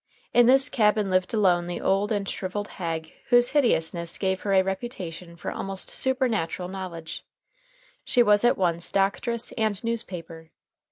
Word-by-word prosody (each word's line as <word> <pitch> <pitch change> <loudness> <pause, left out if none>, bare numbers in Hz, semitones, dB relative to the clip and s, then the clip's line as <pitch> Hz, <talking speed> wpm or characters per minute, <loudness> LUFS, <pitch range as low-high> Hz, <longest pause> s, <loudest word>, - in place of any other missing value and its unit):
In 240 -1 +6
this 270 +1 +5
cabin 210 -5 +2
lived 185 0 +1
alone 180 -5 +2
the 175 -1 -4
old 195 +2 +1
and 200 -2 -1
shriveled 200 +2 -4
hag 165 -3 -5
whose 245 0 +5
hideousness 170 - +1
gave 190 -1 -1
her 200 - -2
a 190 -1 +5
reputation 185 -4 -6
for 170 - -5
almost 195 -1 -4
supernatural 230 -10 -1
knowledge. 170 -4 -7 0.8
She 245 - +3
was 210 -1 +4
at 240 - +4
once 170 -2 0
doctress 210 +4 0
and 215 -2 0
newspaper. 180 -8 -5
195 Hz, 150 wpm, -25 LUFS, 175-225 Hz, 0.8 s, In